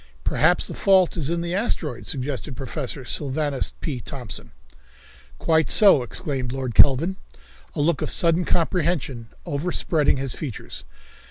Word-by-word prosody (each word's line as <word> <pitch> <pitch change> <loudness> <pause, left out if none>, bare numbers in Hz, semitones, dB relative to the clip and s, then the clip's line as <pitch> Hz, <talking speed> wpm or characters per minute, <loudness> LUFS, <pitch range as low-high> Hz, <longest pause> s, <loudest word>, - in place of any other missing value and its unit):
"Perhaps 175 +4 +2
the - - -3
fault 190 -3 +3
is 155 -5 -2
in 170 0 -1
the 170 0 -3
asteroid," 165 - -2
suggested 135 -1 -3
Professor 135 0 -5
Sylvanus 145 +1 0
P. 140 -6 -3
Thompson. 120 -4 -7 0.9
"Quite 160 -1 +2
so," 195 -10 +6
exclaimed 130 -1 -3
Lord 130 -2 -4
Kelvin, 150 +10 +5 0.6
a - - 0
look 155 0 +1
of - - -1
sudden 170 +1 +3
comprehension 165 -9 -1 0.2
overspreading 150 -1 +1
his 135 -2 -2
features. 135 -9 -7
145 Hz, 135 wpm, -23 LUFS, 130-170 Hz, 0.9 s, so